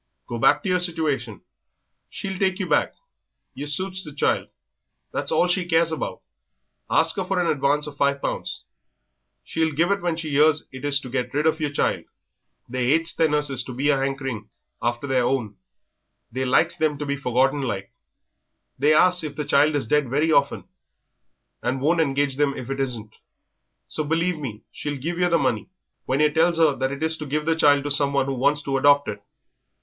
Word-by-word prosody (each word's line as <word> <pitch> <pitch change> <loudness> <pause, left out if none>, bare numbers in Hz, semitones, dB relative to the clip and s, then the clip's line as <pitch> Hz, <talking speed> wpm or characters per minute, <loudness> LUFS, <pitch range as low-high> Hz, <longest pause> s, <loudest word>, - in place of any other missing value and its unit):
Go 120 - -5
back 145 +5 +4
to - - -2
yer 180 0 +2
situation 150 - -1 0.7
she'll 195 -2 -5
take 190 -1 +1
you 190 -3 -3
back, - - +1 0.6
yer 145 +2 -6
suits 185 +5 -3
the 150 - -7
child, 140 - 0 0.7
that's - - -2
all 180 - +3
she 180 +1 +1
cares 165 -1 +3
about; 160 - -4 0.7
ask 160 0 +3
'er - - 0
for 185 0 -1
an 175 - +1
advance 145 -1 +1
of 145 -1 -9
five 140 0 +1
pounds; - - -4 0.8
she'll 160 -1 -1
give 165 +6 +1
it 200 0 0
when 170 -2 -1
she 160 -2 -5
'ears 155 +2 +3
it 130 0 -10
is 145 -1 +2
to - - -9
get 130 0 -2
rid 150 +2 +1
of 160 0 +2
yer 150 - 0
child 145 - -1 0.6
they 125 0 -2
'ates 165 +1 0
their 160 - +2
nurses 145 -4 0
to 125 - -8
be 140 +4 0
a 145 - +4
'ankering 135 -5 -3 0.3
after 120 +3 -1
their 130 -2 +1
own, 120 -5 -1 0.8
they 130 +3 -2
likes 160 +7 +2
them 155 -3 0
to 150 - -4
be 140 0 -1
forgotten 135 +1 +1
like; 100 -7 -4 0.9
they 150 +3 +4
asks 180 +1 +4
if 150 -2 -5
the 150 0 -3
child 145 +2 +3
is 145 - 0
dead 145 +2 +1
very 150 +5 +1
often, 140 -2 +2 1.0
and 125 +2 -1
won't 165 +5 +2
engage 140 -2 0
them 145 -1 +1
if 130 +1 -6
it 135 - -3
isn't, 115 -5 -3 0.7
so 155 - -3
believe 165 +2 0
me 110 -7 -6
she'll 145 -1 -5
give 170 +6 -4
yer 180 0 +3
the 170 - +4
money 115 -1 -1 0.4
when 135 - 0
yer 150 -1 +4
tells 165 +2 +2
'er 155 -4 +4
that 130 0 -1
it 140 +2 -5
is 160 0 +2
to 150 - -6
give 150 +2 -2
the 165 0 +2
child 145 -3 +4
to 145 - -3
someone 140 -1 +2
who 135 - -2
wants 140 +3 +1
to 135 -2 -1
adopt 145 +1 +4
it. 100 0 -5
145 Hz, 200 wpm, -23 LUFS, 135-160 Hz, 1.0 s, back